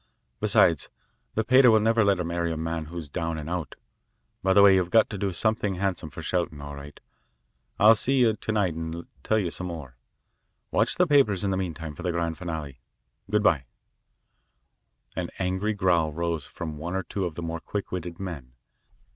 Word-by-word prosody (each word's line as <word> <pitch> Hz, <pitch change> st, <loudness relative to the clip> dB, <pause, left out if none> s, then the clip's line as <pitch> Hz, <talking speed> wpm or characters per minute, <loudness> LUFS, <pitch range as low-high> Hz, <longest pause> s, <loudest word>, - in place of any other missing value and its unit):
Besides, -, -, +3 dB, 0.5 s
the 110 Hz, -, +1 dB
pater 130 Hz, +2 st, +6 dB
will 110 Hz, -1 st, +6 dB
never 115 Hz, +1 st, +3 dB
let 100 Hz, -1 st, +3 dB
her 90 Hz, -, -2 dB
marry 85 Hz, 0 st, -1 dB
a 80 Hz, -, -3 dB
man 80 Hz, 0 st, -3 dB
who's 85 Hz, 0 st, -6 dB
down 80 Hz, +2 st, -3 dB
and 75 Hz, -1 st, -6 dB
out. 85 Hz, -4 st, -4 dB, 0.7 s
By 95 Hz, 0 st, +3 dB
the 100 Hz, +1 st, +7 dB
way, 100 Hz, -1 st, +8 dB
you've 90 Hz, -2 st, +2 dB
got 110 Hz, +3 st, +4 dB
to 105 Hz, -, -4 dB
do 100 Hz, -1 st, 0 dB
something 105 Hz, +1 st, 0 dB
handsome 90 Hz, -4 st, -2 dB
for 65 Hz, -, -9 dB
Shelton. 85 Hz, -4 st, -1 dB
All 70 Hz, 0 st, -7 dB
right. 70 Hz, 0 st, -10 dB, 0.8 s
I'll 110 Hz, +2 st, +8 dB
see 130 Hz, +5 st, +1 dB
you 115 Hz, -3 st, +4 dB
to 110 Hz, +1 st, -4 dB
night 100 Hz, -6 st, +1 dB
and 80 Hz, +1 st, -5 dB, 0.2 s
tell 110 Hz, -, +2 dB
you 90 Hz, -6 st, 0 dB
some 90 Hz, -, -4 dB
more. 75 Hz, -8 st, -8 dB, 0.7 s
Watch -, -, +2 dB
the 180 Hz, -, +4 dB
papers 135 Hz, -, +3 dB
in 100 Hz, -, 0 dB
the -, -, 0 dB
meantime 80 Hz, -4 st, -4 dB
for -, -, -10 dB
the 90 Hz, -, -1 dB
grand 85 Hz, -2 st, -2 dB
finale. 80 Hz, -7 st, -5 dB, 0.5 s
Good 105 Hz, +1 st, +2 dB
bye." 75 Hz, -9 st, +3 dB, 1.5 s
An -, -, -3 dB
angry 95 Hz, +3 st, -1 dB
growl 85 Hz, -5 st, +2 dB
rose 85 Hz, -2 st, -2 dB
from 80 Hz, -3 st, -6 dB
one 85 Hz, +4 st, -4 dB
or 95 Hz, -, -1 dB
two 95 Hz, +2 st, -3 dB
of 85 Hz, -3 st, -4 dB
the 85 Hz, -, -5 dB
more 85 Hz, 0 st, -3 dB
quick 100 Hz, +4 st, -5 dB
witted 85 Hz, -2 st, -5 dB
men. 80 Hz, -10 st, -7 dB
90 Hz, 195 wpm, -26 LUFS, 80-100 Hz, 1.5 s, way